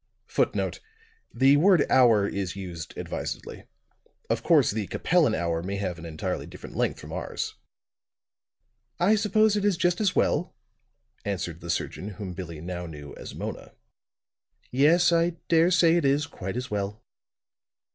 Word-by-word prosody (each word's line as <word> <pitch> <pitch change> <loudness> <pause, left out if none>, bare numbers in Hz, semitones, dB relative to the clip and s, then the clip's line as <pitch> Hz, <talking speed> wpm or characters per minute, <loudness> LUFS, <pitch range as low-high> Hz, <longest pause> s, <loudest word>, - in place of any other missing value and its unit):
[Footnote: - - -1 0.5
The 135 +4 +5
word 180 0 +5
hour 115 -6 +5
is 95 -3 -3
used 90 -4 -7
advisedly. - - -5 0.7
Of - - 0
course, - - +4
the 105 -2 -3
Capellan 165 -10 +2
hour 85 -1 -1
may 95 +3 -4
have 95 -3 -3
an 85 - -8
entirely 80 -1 -4
different - - -11
length - - 0
from - - -9
ours.] - - -4 1.5
"I 185 +5 +4
suppose 215 0 +3
it 205 - 0
is 205 -4 +2
just 175 +2 +1
as 195 -3 +1
well," 175 +5 +1 0.7
answered 90 -4 -4
the 85 - -8
surgeon 95 - -2
whom 100 -4 -5
Billie 85 -3 -7
now 90 0 -5
knew 75 -3 -9
as - - -9
Mona. - - -6 1.0
"Yes, 155 +8 +4
I 170 0 +2
dare 165 +1 +5
say 170 -2 +4
it 170 - +1
is 140 +2 +2
quite 95 - -6
as 125 -2 -5
well." 105 +2 -3
115 Hz, 150 wpm, -26 LUFS, -, 1.5 s, The